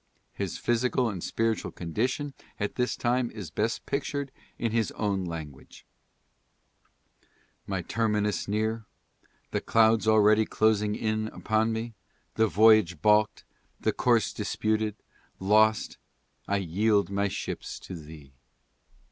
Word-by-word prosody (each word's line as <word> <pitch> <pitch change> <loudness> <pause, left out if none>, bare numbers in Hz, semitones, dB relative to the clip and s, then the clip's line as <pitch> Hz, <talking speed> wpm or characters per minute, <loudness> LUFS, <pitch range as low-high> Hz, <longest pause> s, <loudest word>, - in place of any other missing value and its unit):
His - - -4
physical 120 +1 +1
and 90 -4 -6
spiritual 115 -1 -1
condition 125 - -2 0.3
at 105 -1 -2
this 125 -1 -1
time 120 0 0
is 105 -6 -8
best 110 +3 -1
pictured 140 0 -3 0.3
in 115 - -1
his 115 -1 +1
own 100 -3 -1
language: 80 -5 -8 0.9
" - - -41 0.7
My 95 -3 -2
terminus 105 0 0
near, 110 +2 -1 0.6
The - - -1
clouds 110 -1 +3
already 110 0 +5
closing 105 -1 +2
in 110 0 -1
upon 110 +1 0
me, 115 +1 -4 0.4
The 110 0 +3
voyage 110 -6 +5
balk'd, 105 +4 +3 0.4
the - - 0
course 120 -3 +2
disputed, 110 0 -1 0.4
lost, 110 +3 +2 0.5
I 100 - +1
yield 100 +3 +1
my 100 +1 +1
ships 95 - -5
to - - -9
Thee. 75 -4 -12
110 Hz, 120 wpm, -28 LUFS, 100-115 Hz, 0.9 s, already